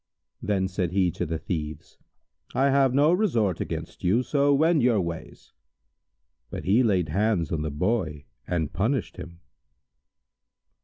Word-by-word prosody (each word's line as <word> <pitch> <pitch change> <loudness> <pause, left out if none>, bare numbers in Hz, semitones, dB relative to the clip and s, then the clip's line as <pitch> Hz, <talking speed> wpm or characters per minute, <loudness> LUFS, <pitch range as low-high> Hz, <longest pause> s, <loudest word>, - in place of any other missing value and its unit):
Then 95 -2 0
said 90 -2 -2
he 95 -2 +2
to - - -4
the 80 +1 -2
Thieves, 80 -1 -6 0.6
"I 135 +1 +3
have 135 -1 +3
no 145 +5 +4
resort 120 - +1
against - - -6
you, 105 +8 +2
so 145 +1 +2
wend 155 +2 +3
your 120 -3 +3
ways!" 85 -2 -6 1.0
But - - -6
he 100 +7 +3
laid 95 -8 +2
hands 100 -2 0
on 80 - -1
the 75 - -2
Boy 75 -2 -2 0.2
and 80 -4 -2
punished 115 +6 -1
him. 85 0 -10
100 Hz, 145 wpm, -26 LUFS, 85-130 Hz, 1.0 s, no